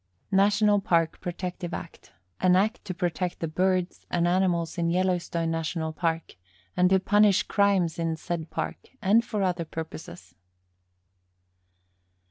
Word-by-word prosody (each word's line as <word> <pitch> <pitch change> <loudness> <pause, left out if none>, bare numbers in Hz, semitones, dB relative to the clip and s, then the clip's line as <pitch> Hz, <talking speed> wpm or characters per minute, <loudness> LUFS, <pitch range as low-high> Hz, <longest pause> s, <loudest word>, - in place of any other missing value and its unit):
National 205 +1 +4
Park 165 -4 +1
Protective 180 0 -4
Act - - -10 0.3
An 180 -1 +4
Act 215 +6 +1
to 190 - -4
protect 175 0 -2
the 165 - -2
birds 180 +2 0
and 175 0 +1
animals 175 -2 +1
in 170 0 +1
Yellowstone 175 -2 0
National 160 0 -2
Park, 165 - -2 0.4
and 180 0 +4
to 190 0 +4
punish 205 0 +4
crimes 195 -5 +1
in 165 -1 0
said 165 -1 -4
Park, - - -4
and 220 +2 +4
for 210 -4 -2
other 180 -2 0
purposes. 155 - -8
180 Hz, 130 wpm, -27 LUFS, 165-190 Hz, 0.4 s, National